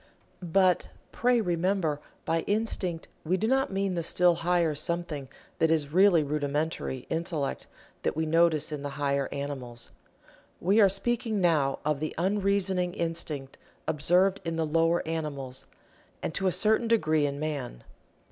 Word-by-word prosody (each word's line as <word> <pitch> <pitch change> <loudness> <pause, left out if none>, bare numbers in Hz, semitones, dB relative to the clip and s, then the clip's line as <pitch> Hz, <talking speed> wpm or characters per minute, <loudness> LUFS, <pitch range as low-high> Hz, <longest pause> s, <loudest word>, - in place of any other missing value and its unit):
But, 180 +1 +2 0.2
pray 245 0 +2
remember, 175 -4 0 0.2
by 165 0 +1
Instinct 200 -5 -1 0.2
we 180 +4 +1
do 220 - 0
not 265 0 +2
mean 195 -1 0
the 170 - -1
still 175 +1 +3
higher 170 -1 +1
something 150 -2 -3 0.3
that 160 - +3
is 155 -2 0
really 185 -3 +5
rudimentary 145 -2 -2
Intellect 160 -4 -2 0.3
that - - -1
we 160 +1 0
notice 160 -1 +2
in 150 -2 -4
the 145 - -4
higher 140 -1 0
animals. 130 -4 -5 0.7
We 200 +5 +3
are 200 - +7
speaking 225 +2 0
now 155 -7 +2
of 150 -2 +1
the 155 +1 -4
unreasoning 190 -1 +1
instinct 160 -5 -3 0.3
observed 180 +6 +2
in 165 -1 -3
the 160 -1 0
lower 165 +2 +1
animals, 140 -5 -4 0.6
and - - -2
to 195 - 0
a - - +3
certain 220 +4 +2
degree 155 -10 +2
in 140 0 -4
man. 145 - -4
165 Hz, 145 wpm, -28 LUFS, 150-190 Hz, 0.7 s, are